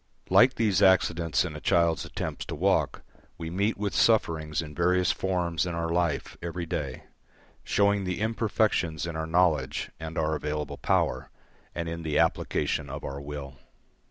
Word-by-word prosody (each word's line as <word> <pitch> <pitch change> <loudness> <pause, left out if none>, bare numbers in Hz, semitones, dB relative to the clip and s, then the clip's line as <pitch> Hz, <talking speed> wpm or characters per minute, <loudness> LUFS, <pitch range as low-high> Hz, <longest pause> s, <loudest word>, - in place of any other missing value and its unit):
Like 130 +2 +6
these 105 -4 +2
accidents 85 -4 +3
in 80 -4 -5
a - - -6
child's 85 -4 +2
attempts - - -4
to - - -5
walk, - - +1 0.3
we 80 0 -5
meet 100 +5 0
with 100 0 -2
sufferings 80 -8 +2
in 75 -2 -4
various 90 +2 +2
forms 90 -3 -1
in 85 - -3
our 85 0 -2
life 85 -3 -1
every 85 0 -4
day, 70 -5 -4 0.6
showing 100 0 +2
the 90 -1 -3
imperfections 110 -7 0
in 85 -1 -5
our 80 0 -3
knowledge 80 -5 +1
and 80 0 -6
our 80 0 +1
available 75 -1 -3
power, - - 0 0.5
and 85 -1 -3
in 85 0 -4
the 80 -2 -1
application 70 - 0
of 70 +2 -6
our 70 0 -5
will. 70 -3 -7
85 Hz, 160 wpm, -27 LUFS, 75-90 Hz, 0.6 s, Like